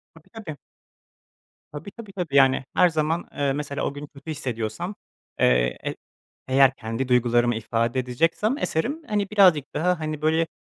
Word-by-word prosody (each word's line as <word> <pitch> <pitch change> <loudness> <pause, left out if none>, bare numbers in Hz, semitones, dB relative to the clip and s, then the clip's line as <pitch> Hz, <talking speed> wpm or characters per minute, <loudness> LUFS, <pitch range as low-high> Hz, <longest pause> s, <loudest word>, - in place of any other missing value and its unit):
Tabii, 165 - -19
tabii. 205 -10 -8 1.1
Tabii, 150 +7 -8
tabii. 215 -2 -11
Tabii, 170 -7 -3
yani, 135 -1 +5
her 180 - +5
zaman, 160 +1 -1
eee, 140 -1 0
mesela 140 0 -4
o - - -1
gün 145 +1 -8
kötü 145 +3 -9
hissediyorsam, 130 - -4 0.4
eee, 60 0 +3
e - - -2 0.5
eğer 135 0 +5
kendi 115 +3 -4
duygularımı 120 -1 +3
ifade 115 +3 -1
edeceksem 165 - 0
eserim, 290 - -2
hani, 205 -2 -1
birazcık 180 -9 +4
daha, 180 +2 +1
hani, 155 -1 -4
böyle 160 +1 +2
150 Hz, 155 wpm, -24 LUFS, 125-175 Hz, 1.1 s, yani